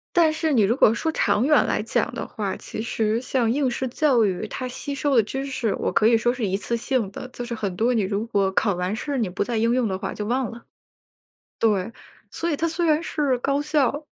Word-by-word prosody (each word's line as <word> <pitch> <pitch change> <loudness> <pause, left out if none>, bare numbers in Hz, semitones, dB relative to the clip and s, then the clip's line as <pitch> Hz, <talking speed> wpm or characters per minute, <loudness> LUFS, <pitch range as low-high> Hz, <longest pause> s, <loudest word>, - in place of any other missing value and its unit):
但 330 -2 +5
是 315 0 -1
你 245 - +4
如 215 +4 +2
果 225 -4 +5
说 320 +7 -1
长 210 0 +2
远 300 0 +4
来 - - 0
讲 - - -1
的 - - -5
话， 205 -4 -3
其 220 - -6
实 220 0 0
像 250 -2 0
应 265 +2 +1
试 260 +2 -2
教 250 -3 +3
育 190 +1 -1
它 255 - -4
吸 280 +3 -5
收 280 -1 0
的 225 - +5
知 270 +6 -4
识， 255 -6 -1
我 - - -1
可 - - +2
以 230 0 +6
说 240 +2 +1
是 245 -4 -2
一 195 0 0
次 235 +3 -2
性 235 -3 -1
的， 205 - -7
就 245 -1 -6
是 235 - -4
很 200 -4 -3
多 240 +4 +2
你 225 - +2
如 200 +3 -1
果 200 -4 +1
考 200 +1 +2
完 180 +3 -2
试 280 +4 -3
你 220 -6 0
不 180 - -5
再 235 +3 -1
应 230 +2 +2
用 250 -3 +1
的 190 - -2
话 195 0 -4
就 210 - -5
忘 250 +2 -1
了。 235 0 -12 0.9
对， 210 -2 +1 0.4
所 340 - -2
以 295 - 0
它 330 +2 0
虽 335 +2 -1
然 310 +1 +3
是 285 -6 0
高 275 +3 0
效， 295 -1 0
235 Hz, 265 characters per minute, -23 LUFS, 215-275 Hz, 0.9 s, 以